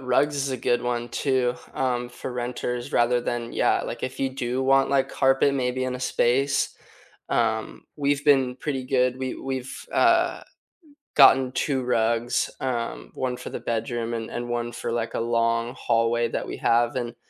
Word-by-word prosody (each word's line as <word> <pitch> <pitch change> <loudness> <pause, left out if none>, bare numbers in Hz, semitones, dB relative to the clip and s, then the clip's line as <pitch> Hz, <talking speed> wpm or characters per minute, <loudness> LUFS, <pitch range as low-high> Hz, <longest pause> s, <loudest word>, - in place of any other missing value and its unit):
rugs 135 +3 +1
is 140 -1 -1
a 130 - -1
good 120 0 0
one 120 -1 -2
too, 130 -1 0 0.2
um, 125 -2 -1
for 125 +1 -7
renters 125 0 -3
rather 120 +1 +3
than, 120 -1 -3
yeah, - - +2
like, - - -6
if 130 - -6
you 135 - +1
do 130 -1 -2
want, 135 0 +4
like, 135 -1 +2
carpet 135 +1 +3
maybe 130 -1 -1
in 130 0 -2
a - - -10
space? 135 +3 +1 0.5
Um, 110 -2 -1
we've 145 0 0
been 135 -4 +4
pretty 135 -2 -3
good, 125 -1 +1
we 130 -1 -3
we've, 130 - -5
uh, - - +3 0.7
gotten 135 -2 +7
2 135 -2 0
rugs, 115 -1 +1
um, 115 - -3
1 125 -1 -2
for - - -7
the - - -4
bedroom 115 0 -2
and 115 -1 -4
and 120 0 -5
1 120 0 -2
for, 120 - -4
like, 115 -1 -2
a - - 0
long 115 0 +1
hallway 115 +1 +1
that - - -3
we - - -5
have, 120 +2 +2
and, 120 -2 -3
125 Hz, 175 wpm, -25 LUFS, 120-130 Hz, 0.7 s, gotten